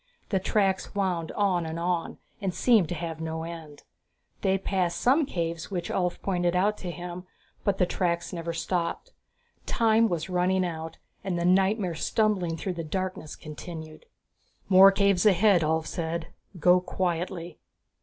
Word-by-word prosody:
The 195 - +1
tracks 195 0 0
wound 180 -5 -1
on 190 -4 +1
and 160 0 -4
on, 175 -1 -1 0.2
and 190 -3 -2
seemed 215 -6 +4
to 175 - -2
have 165 -1 -5
no 160 0 -3
end. 165 -3 -9 0.6
They 190 0 +2
passed 185 -3 -1
some 275 +4 +3
caves 165 - -3
which 180 -4 -3
Ulv 180 -2 -1
pointed 175 -2 0
out 200 +4 +2
to 180 - -5
him, 175 +1 -7 0.4
but 200 -2 +1
the 180 - +3
tracks 170 -1 -1
never 170 -1 -3
stopped. 170 +1 -2 0.6
Time 225 0 +3
was 165 -2 -2
running 185 0 +1
out 160 -1 -5 0.3
and 190 -3 -2
the 170 - -1
nightmare 190 0 +3
stumbling 180 -1 0
through 185 +2 -3
the 170 -1 -5
darkness 185 -1 -4
continued. 155 0 -9 0.6
"More 195 +1 +9
caves 200 0 +3
ahead," 195 -1 +5
Ulv 160 0 +1
said, 165 -1 -3 0.3
"Go 180 +3 +5
quietly." 175 -2 -3
180 Hz, 155 wpm, -27 LUFS, 165-190 Hz, 0.6 s, More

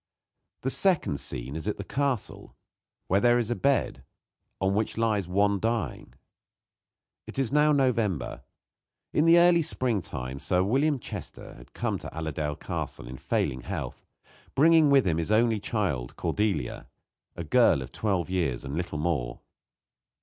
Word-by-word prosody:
The 135 - 0
second 170 - +2
scene 65 +1 -4
is 80 +4 -4
at 105 - -1
the 100 - -5
castle, 135 0 -3 0.5
where 95 - +2
there 120 +2 +4
is 120 -1 -1
a - - +1
bed 140 +1 0 0.6
on 95 0 +1
which 110 +2 -1
lies 110 -5 +1
one 100 +2 +2
dying. 115 +2 -3 1.1
It - - -8
is 135 -1 0
now 150 +1 +4
November. 115 - 0 0.7
In 150 - +3
the 165 +1 +7
early 170 0 +6
springtime 90 - -2
Sir 90 +4 +1
William 140 +8 +2
Chester 120 - -8
had - - -16
come - - -2
to - - -7
Allerdale 75 -1 -3
Castle - - -5
in 65 +1 -8
failing 65 0 -1
health, - - -6 0.5
bringing 160 +2 +5
with 140 -2 +5
him 85 -3 +1
his 85 +5 -2
only 110 0 +3
child, 90 - -2
Cordelia, 95 - -2 0.5
a - - -5
girl 65 - +3
of 65 - -11
twelve 95 -2 -1
years 85 -9 -1
and 70 +2 -5
little 85 -2 -3
more. 75 -6 -2
105 Hz, 150 wpm, -27 LUFS, 80-130 Hz, 1.1 s, the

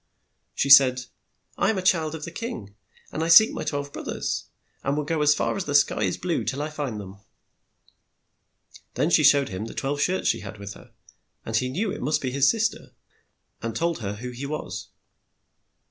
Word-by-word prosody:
She 140 - +1
said, 130 -2 +8 0.6
"I - - +3
am 220 - +1
the 190 - -3
child 160 -4 +2
of 150 - -6
a 170 - -7
king, 170 - -6 0.4
and 160 - -2
I - - -1
seek 170 +7 +8
my - - -5
twelve 145 -1 -4
broth - - -7
ers, - - -3 0.4
and 140 +2 -1
will 150 - 0
go 155 +1 -1
as 150 0 +4
far - - -1
as 200 - -3
the 145 - -2
sky 145 - +3
is 95 -4 0
blue 175 -2 -2
till 140 +2 -2
I 155 - -5
find 140 -8 -4
them. 100 0 -10 1.8
Then 160 - +1
she 155 - +5
showed 140 -1 +5
him 95 +3 -5
the 115 - -9
twelve 145 +1 -2
shirts 185 +5 0
she - - +1
had - - -9
with 100 0 -8
her, - - -16 0.5
and 110 - -3
he 125 +3 +1
knew 195 +9 -2
it - - -6
must 150 +5 +1
be 130 - -3
his 135 +1 +3
sis 225 -1 +2
ter, - - -15 0.7
and 115 -1 -4
told 170 +2 -1
her 100 -2 -4
who 125 +4 -7
he 130 +3 -6
was. 155 +1 -5
145 Hz, 210 wpm, -25 LUFS, 125-165 Hz, 1.8 s, said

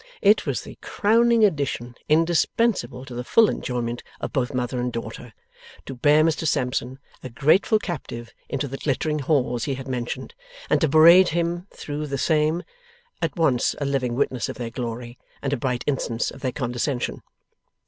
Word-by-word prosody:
It 210 +2 +4
was - - -1
the - - -12
crowning 230 +1 +3
addition 140 - -1 0.2
indispensable 165 - +1
to 130 - -9
the 120 +1 -4
full 225 - +5
enjoyment 120 -1 -3 0.2
of - - -5
both 125 -3 0
mother 125 -1 -2
and 125 0 -1
daughter, 115 +1 -7 0.5
to 135 - -6
bear 145 +4 +4
Mr 160 0 +1
Sampson, 125 -1 -1 0.2
a 130 - -7
grateful 155 - +3
captive, 130 - -6 0.2
into 140 +1 -2
the 135 +1 -6
glittering 150 +2 -1
halls 130 -4 0
he 140 - -1
had 135 0 -8
mentioned, 125 - -4 0.4
and - - +3
to 160 - +3
parade 170 +5 +7
him 170 +2 -1
through 150 +1 -5
the 140 -1 -3
same, 155 +4 +1 0.6
at - - -1
once 135 -7 +2
a 145 - -1
living 130 -3 -1
witness 130 -2 -1
of - - -6
their 120 -2 -5
glory, 120 0 -6 0.2
and 140 0 -2
a - - +1
bright 125 0 -2
instance 125 -5 -1
of 135 - -12
their 130 - -1
condescension. 120 +1 -2
135 Hz, 170 wpm, -24 LUFS, 125-160 Hz, 0.6 s, parade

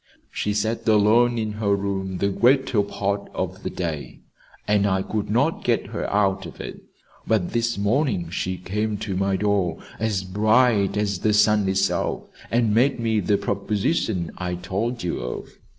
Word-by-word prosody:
She 105 0 -2
sat 110 +3 -1
alone 110 +3 +4
in 110 -1 -1
her 100 -1 +3
room 95 -2 -3
the 100 - +1
greater 125 +1 +3
part 100 0 -2
of 95 +2 -3
the - - -3
day, 80 -5 -5 0.5
and 105 -1 +3
I 95 -1 +1
could 105 -1 -3
not 135 +9 +1
get 120 -2 +1
her - - -2
out 95 -2 +1
of 80 - -12
it. - - -7 0.5
But 105 -6 +1
this 115 -1 0
morning 100 - 0
she 95 0 -2
came 105 +3 -2
to 100 -2 -4
my 95 +1 +1
door 100 -4 +1 0.2
as 105 -4 0
bright 105 +1 +3
as 100 -3 0
the 105 +2 +2
sun 105 -1 +4
itself 95 +1 0 0.3
and 115 -2 +2
made 125 +4 +3
me 110 -2 +1
the 100 +1 +2
proposition 100 - -1
I 90 -1 -2
told 100 +7 -3
you 90 - -2
of. 60 0 -5
105 Hz, 165 wpm, -23 LUFS, 95-110 Hz, 0.5 s, alone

